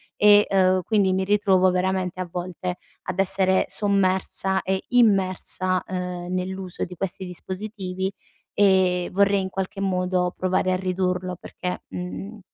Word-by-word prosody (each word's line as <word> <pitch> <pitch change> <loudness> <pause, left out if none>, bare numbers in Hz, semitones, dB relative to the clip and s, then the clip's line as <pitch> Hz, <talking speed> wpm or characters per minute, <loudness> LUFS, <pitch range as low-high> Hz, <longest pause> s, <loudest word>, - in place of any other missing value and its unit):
e, 210 0 +6
uhm, 185 -1 +3
quindi 200 -1 +2
mi 190 - 0
ritrovo 190 -2 +3
veramente 185 0 -1
a 185 - -3
volte 180 0 -4 0.3
ad 185 +1 -4
essere 190 -1 +3
sommersa 190 -1 +2
e 190 +1 -2
immersa, 190 -5 +2
uhm, 180 -1 -4
nell'uso 185 0 -4
di 180 - -10
questi 190 +1 -4
dispositivi 190 +1 -5 0.4
e 185 -3 +3
vorrei 200 +1 +3
in 190 - -4
qualche 190 +1 -4
modo 180 -1 0
provare 185 0 0
a 185 - +2
ridurlo 185 0 -1
perché, 180 -1 -6
mhmm, 195 +4 -6
185 Hz, 135 wpm, -24 LUFS, 180-195 Hz, 0.4 s, e